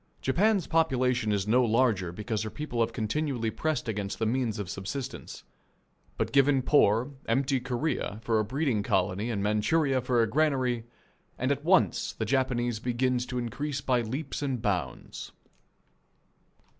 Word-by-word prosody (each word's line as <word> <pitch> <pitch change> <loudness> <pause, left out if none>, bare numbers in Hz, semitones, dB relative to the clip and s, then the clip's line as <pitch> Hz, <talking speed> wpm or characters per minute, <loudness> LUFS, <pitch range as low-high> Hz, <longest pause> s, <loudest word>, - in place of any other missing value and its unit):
Japan's 195 +7 +2
population 130 -8 +1
is 100 -1 0
no 125 +4 +4
larger 110 -6 +2
because 105 +4 -3
her 110 - -3
people 150 -2 -5
have 115 0 +2
continually 120 0 -1
pressed 155 -1 -2
against 105 -3 -3
the 110 - -1
means 115 -1 0
of 105 -2 -4
subsistence. 100 +8 -6 0.7
But - - -1
given 140 -1 +4
poor, 125 -2 +3 0.2
empty 135 +3 +1
Korea 125 -4 -2
for 115 -2 +2
a - - +2
breeding 130 -1 0
colony 100 +1 0
and 105 -4 -2
Manchuria 130 +7 +2
for 125 -1 +2
a - - +1
granary, 130 -3 +1 0.5
and - - 0
at - - -1
once - - +2
the - - -3
Japanese 120 -4 0
begins 125 +1 0
to 125 - -4
increase 130 +4 -3
by 125 -3 +1
leaps 135 +7 -4
and 135 -4 -1
bounds. 90 - -3
120 Hz, 150 wpm, -28 LUFS, 110-135 Hz, 0.7 s, no